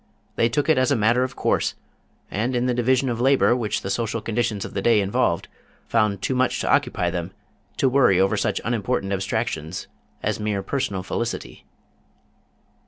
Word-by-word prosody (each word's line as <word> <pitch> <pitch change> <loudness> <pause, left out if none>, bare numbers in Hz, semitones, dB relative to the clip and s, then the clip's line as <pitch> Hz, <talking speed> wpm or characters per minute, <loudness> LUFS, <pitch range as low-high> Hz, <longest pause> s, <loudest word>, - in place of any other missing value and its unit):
They 115 - +2
took 145 +5 0
it 155 -5 +4
as 130 - +2
a 140 - +3
matter 115 +3 +3
of 130 - -4
course, - - 0 0.6
and 120 +5 -1
in 120 0 +1
the 125 - +1
division 130 +2 +2
of 120 -1 -2
labor 135 -1 +4
which 115 -4 -1
the 95 - -3
social 115 +2 -1
conditions 110 -2 -2
of - - -8
the 100 - -2
day 115 +1 +4
involved, 100 0 0 0.4
found 100 -2 +1
too - - 0
much 130 0 +1
to - - +1
occupy 90 -1 +1
them 85 +2 -4 0.4
to 135 - +3
worry 125 -8 +4
over 95 +1 +3
such - - 0
unimportant 110 -3 -1
abstractions 90 -3 -2 0.4
as - - -1
mere 105 -2 -1
personal 100 -5 -2
felicity. 115 +4 -4
115 Hz, 175 wpm, -23 LUFS, 100-125 Hz, 0.6 s, it